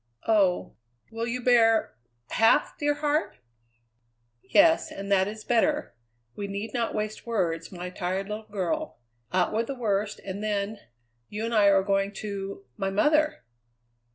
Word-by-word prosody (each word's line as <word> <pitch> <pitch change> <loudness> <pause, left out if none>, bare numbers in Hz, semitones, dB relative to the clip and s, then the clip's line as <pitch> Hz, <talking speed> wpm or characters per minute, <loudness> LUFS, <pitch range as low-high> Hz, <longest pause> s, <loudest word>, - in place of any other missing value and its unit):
"Oh! 195 - +2 0.3
Will 225 +1 -3
you 250 +1 -2
bear 230 - +4 0.4
half, 225 0 +3
dear 290 0 0
heart?" 295 +1 -1 1.0
"Yes, 320 +1 +4
and 200 0 -6
that 190 -1 +4
is 215 +1 -7
better. 295 +6 +1 0.4
We 200 - -4
need 200 +2 -5
not 235 -2 -1
waste 215 +2 -4
words, 170 -8 -1
my 180 -1 -6
tired 185 +2 -3
little 215 +1 -6
girl. 215 - -3 0.3
Out 185 +2 +1
with 225 +2 0
the 275 - -4
worst 210 -3 -1
and 200 +2 -5
then 205 0 -2 0.5
you 215 +2 -4
and 230 - -3
I 210 -2 +5
are 195 -1 +5
going 195 0 0
to 195 -8 -6
my 195 - -1
mother!" 300 - +2
210 Hz, 150 wpm, -27 LUFS, 195-235 Hz, 1.0 s, I